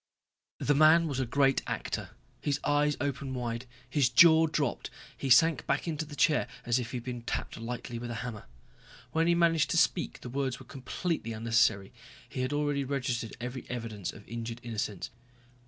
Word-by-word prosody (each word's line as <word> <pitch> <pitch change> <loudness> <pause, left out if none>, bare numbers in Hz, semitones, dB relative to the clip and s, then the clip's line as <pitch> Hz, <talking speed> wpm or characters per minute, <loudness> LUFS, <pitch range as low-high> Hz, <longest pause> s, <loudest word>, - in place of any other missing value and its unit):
The 145 - +2
man 155 +3 +6
was 140 -3 -2
a 130 - 0
great 135 +2 +3
actor. - - -3 0.3
His 145 -1 0
eyes 145 0 +2
opened 140 -2 -3
wide, 120 0 -3 0.2
his 130 0 +2
jaw 160 +5 +7
dropped, 150 -4 -1 0.3
he 135 - -4
sank 145 +2 +5
back 140 - 0
into 160 -1 -2
the 150 -1 -10
chair 150 +2 +3 0.2
as 120 +1 +2
if 120 -2 -4
he 125 - -4
had 120 - -6
been 120 -1 -5
tapped 115 - -4
lightly 120 +1 -5
with 120 0 -6
a 120 - -4
hammer. 110 -4 -6 0.7
When 165 +1 +2
he 170 - +4
managed 165 -2 +3
to - - +1
speak 170 0 +1
the - - -7
words 130 0 -2
were - - -12
completely 135 -1 -3
unnecessary; 110 -3 +2 0.3
he 130 - -4
had 130 +1 -1
already 145 -1 0
registered 125 -4 -2
every 125 +2 -6
evidence 115 -6 -4
of 105 - -14
injured 115 0 -5
innocence. 105 -5 -4
130 Hz, 185 wpm, -30 LUFS, 120-150 Hz, 0.7 s, jaw